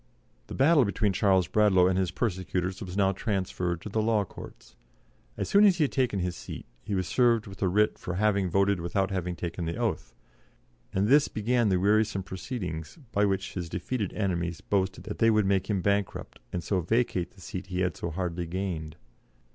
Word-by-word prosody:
The - - -7
battle 145 +1 +5
between 105 -1 0
Charles 95 -2 +3
Bradlaugh 100 -4 +4
and 95 - +2
his 95 -1 +1
persecutors 95 0 -2
was 95 -1 -6
now 95 -1 +4
transferred 90 -4 -2
to - - -7
the 110 +2 0
law 110 -2 +2
courts. 65 - -12 0.6
As - - -2
soon 200 +1 +5
as 195 -4 +6
he 160 - +3
had 140 - 0
taken 125 -6 +1
his 90 0 -2
seat - - -8 0.2
he 100 - -3
was 95 -2 -1
served 120 -3 +3
with 100 0 -11
a 95 - +3
writ 105 +4 +2
for 90 - -4
having 100 -1 +2
voted 100 0 +2
without 95 +3 -1
having 90 -2 -2
taken 85 0 -4
the 85 +1 -2
oath, - - -2 0.8
and 95 +2 +1
this 140 +4 +5
began 115 +1 +1
the 95 -2 +2
wearisome 105 0 +2
proceedings 90 - -5
by 105 0 +2
which 95 -1 -1
his 85 -3 -4
defeated 100 +4 -3
enemies 85 -5 -1
boasted 95 -2 -1
that 105 - -6
they 115 - +5
would 110 -2 +3
make 95 0 +1
him 100 -4 0
bankrupt, 100 0 -1
and 85 -2 -3
so 95 -3 0
vacate 110 0 0
the - - -17
seat 90 +1 -6
he 90 0 -2
had 90 -2 0
so 85 - -4
hardly 85 0 -3
gained. 85 -4 -4
95 Hz, 200 wpm, -28 LUFS, 90-105 Hz, 0.8 s, as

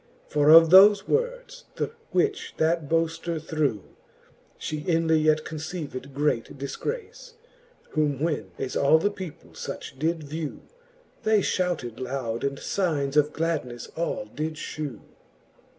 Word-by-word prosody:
For 150 0 +2
of 165 +1 +9
thofe 195 +2 +8
words, - - -2
the - - -2 0.2
which 415 -1 0
that 160 -2 +1
boafter 165 0 0
threw, 150 -9 -1 0.7
She 155 - -4
inly 165 0 +2
yet 155 0 +2
conceived 155 -4 -6
great 140 -4 0
dilgrace. 450 - -5 0.6
Whom 150 -3 0
when 150 - -1
as 130 - -4
all 140 +3 +5
the 205 +6 +1
people 185 -6 -9
fuch 130 - -7
did 160 +1 0
vew. 150 +1 -5 0.6
They 215 -1 +3
fhouted 175 - -1
loud, 125 -3 -3
and 140 0 -1
fignes 150 -8 -1
of 150 0 +4
gladnefle 155 -8 -3
all 165 -9 -2
did 155 +8 -4
fhew. 150 -6 -6
155 Hz, 130 wpm, -26 LUFS, 140-170 Hz, 0.7 s, of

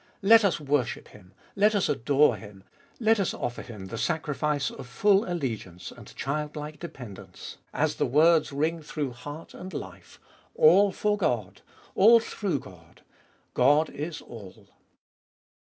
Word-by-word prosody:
Let 225 +3 +7
us 195 -4 +1
worship 140 -4 -1
Him! 95 -3 -18 0.2
Let 210 +2 +3
us 200 - +2
adore 140 0 +3
Him! 100 -1 -13 0.4
Let 225 -2 +3
us 195 - -1
offer 120 0 -4
Him 105 -6 -9
the 110 +4 -6
sacrifice 150 -3 -1
of - - -10
full 200 - +2
allegiance 110 - -5
and - - -14
child 150 +2 -3
like 150 0 -7
dependence, 125 - -10
as - - -1
the - - +1
words 155 +4 +4
ring 160 +4 -1
through 150 -3 -4
heart 145 +6 -10
and 185 +1 -9
life - - -9 0.2
— - - -34
ALL 330 - +6
FOR 210 +1 -1
GOD! 110 - -2 0.3
ALL 230 +4 +7
THROUGH 205 -6 -3
GOD! 85 -6 -16 0.5
GOD 145 +5 +4
is 155 +2 -6
ALL. 105 -6 -12
150 Hz, 150 wpm, -27 LUFS, 120-180 Hz, 0.5 s, Let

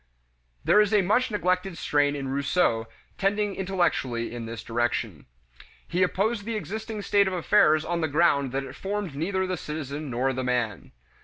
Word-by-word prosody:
1 60 - -41 0.6
There 210 - +6
is 210 0 +2
a 205 - +4
much 220 +7 +2
neglected 185 -3 0
strain 145 -1 +1
in 135 -2 -4
Rousseau 140 -5 +1 0.3
tending 205 +1 +1
intellectually 175 -12 -1
in 120 -2 -5
this 115 -1 -6
direction. 120 0 -2 0.6
He 180 - -1
opposed 205 +4 +1
the 230 +2 -3
existing 215 +3 -5
state 200 -1 +3
of 190 - -2
affairs 160 -3 +4
on 170 0 -1
the 160 - +1
ground 145 -3 +2
that 135 +1 -2
it 135 -1 -8
formed 200 -4 -3
neither 190 +5 -1
the 185 -1 -2
citizen 150 -1 -5
nor 130 +2 0
the 130 0 -3
man. 120 -7 -2
170 Hz, 175 wpm, -26 LUFS, 135-195 Hz, 0.6 s, There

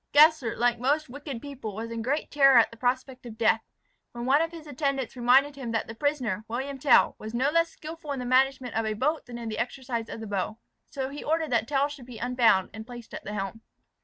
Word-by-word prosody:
Gessler, 300 -5 +5
like 240 -1 +2
most 290 +4 +1
wicked 275 -2 -7
people, 265 -8 -6
was 225 +2 -5
in 230 0 -3
great 275 +7 -1
terror 275 -3 +6
at 230 - +5
the - - -11
prospect 255 +2 -1
of 220 -2 -10
death, 225 0 +3 0.5
when 240 0 -5
one 275 +4 +4
of 330 - 0
his 330 -2 -10
attendants 275 -3 -2
reminded 260 +4 +4
him 245 -4 -5
that 225 - 0
the 225 - -7
prisoner, 245 -6 -1
William 265 +4 -4
Tell, 275 0 +5
was 220 +2 -6
no 265 +4 +2
less 335 +1 +3
skilful 320 -1 -8
in 280 - -2
the 250 - -4
management 260 0 +2
of 225 0 0
a 215 - 0
boat 300 +7 -1
than 240 -1 -7
in 235 -1 -6
the 215 -1 -4
exercise 245 -2 -3
of - - -6
the 220 - -6
bow. 205 +1 -2 0.3
So 265 -1 -3
he 285 +1 -7
ordered 320 -1 0
that 230 -2 +2
Tell 280 -1 +2
should 285 -4 -10
be 245 -3 -9
unbound, 235 -6 +3
and 220 +1 -8
placed 240 -2 -10
at - - -6
the 210 - -5
helm. 195 +2 -4
255 Hz, 240 wpm, -27 LUFS, 230-285 Hz, 0.5 s, terror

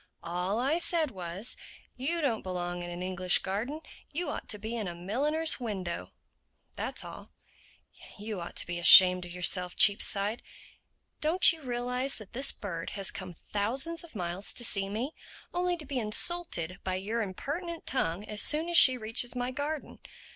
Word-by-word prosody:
"All 180 +4 -2
I 275 +7 +1
said 330 -4 +1
was, 185 +3 -2 0.4
'You 320 +7 -1
don't 240 -7 0
belong 175 -1 -4
in 175 - -6
an 175 +1 -6
English 185 -1 +3
garden; 230 +11 -3 0.3
you 340 +4 -2
ought - - -7
to 210 - 0
be 220 +3 -5
in 220 -4 -3
a 175 - -5
milliner's 285 - 0
window.' 190 -8 -4 0.7
That's - - -4
all." - - -11 0.8
"You 210 -2 -5
ought 170 - -8
to - - +4
be 175 0 -4
ashamed 180 +1 +9
of 175 - -10
yourself, 180 0 0
Cheapside. 205 +2 +3 0.8
Don't 335 +4 +6
you 320 - -11
realize 250 +1 -2
that 215 -3 -12
this 265 +3 +3
bird 170 -5 -6
has 195 - +1
come 185 -2 -8
thousands 265 - -2
of 330 -7 -14
miles 180 0 -1
to 240 - +1
see 195 -3 +2
me—only 335 - -4
to 310 - -11
be 270 -2 -3
insulted 210 - 0
by 185 -1 -2
your 215 +5 -2
impertinent 315 - -5
tongue 190 -6 -1
as 210 -1 -2
soon 315 +3 +2
as 345 - +3
she 260 -1 +7
reaches 235 +2 0
my 245 0 -2
garden? 290 +3 -5
215 Hz, 170 wpm, -29 LUFS, 185-280 Hz, 0.8 s, ashamed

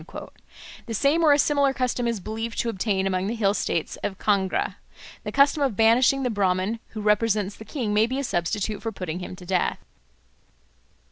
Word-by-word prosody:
The 225 - -3
same 290 +8 +2
or 310 - +6
a 285 - +6
similar 285 -2 +2
custom 250 -1 -1
is 230 -3 -1
believed 225 +4 -5
to 235 - -2
obtain 195 -2 -1
among 185 0 0
the 225 - -2
hill 200 -3 +2
states 165 -5 -2
about 195 - -3
Kangra. 200 -3 0 0.5
The - - -4
custom 280 +2 +3
of 265 -7 +1
banishing 240 +5 +4
the 250 - 0
Brahman 195 +1 0 0.2
who - - -3
represents 210 -1 +1
the 220 - -11
king 235 -8 -3
may 215 +2 +4
be 260 +2 -3
a 280 - -1
substitute 205 0 -2
for 225 - -3
putting 180 -4 -5
him 180 0 -7
to 180 - -12
death. 180 0 0
220 Hz, 190 wpm, -25 LUFS, 195-250 Hz, 0.5 s, or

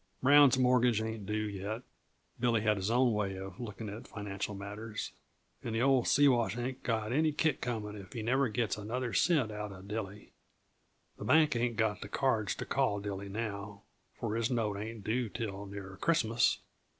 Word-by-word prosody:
Brown's 140 -1 +7
mortgage 125 -3 +4
ain't 110 -2 -4
due 110 0 -1
yet" 105 +4 -4 0.6
(Billy 120 -2 +2
had 105 -1 +2
his 95 +2 -1
own 120 0 +4
way 100 -2 -1
of 95 0 -8
looking 110 -2 -6
at 105 +3 -7
financial 105 0 -4
matters) 105 +2 -5 0.5
"and 115 -2 -3
the 115 - +2
old 135 -2 +4
Siwash 125 -5 +4
ain't 125 +2 -3
got 110 -2 -1
any 155 +2 +3
kick 150 -1 +1
comin' 110 -4 -3
if 100 -1 -10
he 115 -3 -4
never 130 +3 +2
gets 110 -2 -1
another 120 +3 -3
cent 145 -11 +3
out 105 -1 -5
uh 95 -1 -10
Dilly. 105 0 -6 0.9
The - - -5
bank 155 -4 +5
ain't 120 0 0
got 110 -2 +1
the - - -7
cards 110 -7 +1
to - - -5
call 100 - +1
Dilly 100 -1 -5
now, 100 -1 -5 0.3
for 105 - -3
his 115 0 +1
note 115 -5 0
ain't 110 +1 -6
due 115 +2 0
till 100 -3 -5
near 95 -1 -8
Christmas. 120 -8 +3
110 Hz, 180 wpm, -32 LUFS, 105-125 Hz, 0.9 s, Brown's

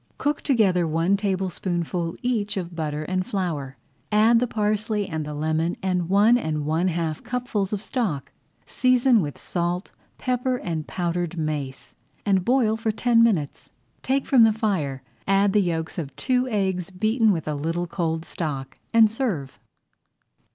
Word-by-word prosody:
Cook 290 +1 -1
together 195 - +2
one 165 +5 +2
tablespoonful 180 -3 -2
each 220 -5 -1
of 175 -2 -4
butter 155 -2 -3
and 185 +3 -1
flour, 160 -10 -3 0.3
add 220 +2 +5
the 250 - +1
parsley 210 -1 0
and 155 -3 -4
lemon 160 +2 0
and 180 -2 0
one 210 +5 +5
and 155 -7 -2
one 160 +4 +1
half 165 -3 -2
cupfuls 240 -6 -2
of 210 -1 -2
stock. 165 - -2 0.3
Season 255 -2 +3
with 145 -4 -4
salt, 175 +1 -2 0.3
pepper, 250 0 0
and 160 -8 -4
powdered 175 -1 -2
mace, 150 -4 -4 0.3
and 195 -3 +2
boil 240 -1 +3
for 225 0 0
ten 230 +1 +3
minutes. 185 -11 +1 0.3
Take 270 +1 0
from 255 -4 +6
the 220 -1 +5
fire, 165 - -1 0.2
add 195 0 +3
the 210 - +4
yolks 165 -2 -2
of 140 -5 -6
two 255 -1 +1
eggs 190 -5 -1
beaten 215 +4 +2
with 165 -5 -2
a 150 - 0
little 165 +4 -2
cold 165 -2 -2
stock, 135 -5 -5
and 225 -1 +7
serve. 210 - -3
185 Hz, 150 wpm, -24 LUFS, 160-220 Hz, 0.3 s, and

